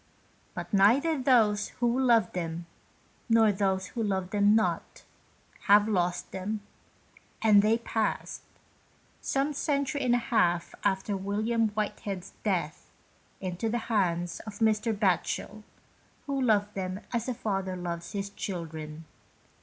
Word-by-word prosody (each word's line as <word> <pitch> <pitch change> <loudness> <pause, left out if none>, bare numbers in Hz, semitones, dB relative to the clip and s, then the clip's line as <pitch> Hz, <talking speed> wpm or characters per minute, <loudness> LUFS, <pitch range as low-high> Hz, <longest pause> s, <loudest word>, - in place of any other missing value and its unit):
But - - -6
neither 245 +12 +4
those 230 -7 +3
who 240 +1 +2
loved 235 -7 +3
them, 170 -1 -4 0.6
nor 225 -2 +5
those 190 -1 0
who 235 - -4
loved 190 -3 -1
them 205 0 +4
not, 220 - -1 0.6
have 205 +1 +6
lost 180 -4 0
them, 205 +3 -4 0.8
and 210 -2 +6
they 215 +2 +3
passed, 225 -2 -2 0.8
some 275 +2 0
century 285 0 -1
and 245 -1 +3
a - - +4
half 175 -8 +1
after 200 0 0
William 215 +4 0
Whitehead's 205 -3 -4
death, 180 -7 -2 0.5
into 185 +4 -2
the 235 - 0 0.2
hands 175 -4 0
of 215 -2 -9
Mr. 220 0 +2
Batchel, 205 +1 -1 0.6
who 275 -1 -1
loved 210 -4 +2
them 185 +1 -4
as 235 +1 -1
a 250 - -2
father 195 -4 -2
loves 170 0 -5
his 200 -1 -3
children. 160 -5 -6
205 Hz, 130 wpm, -28 LUFS, 185-225 Hz, 0.8 s, have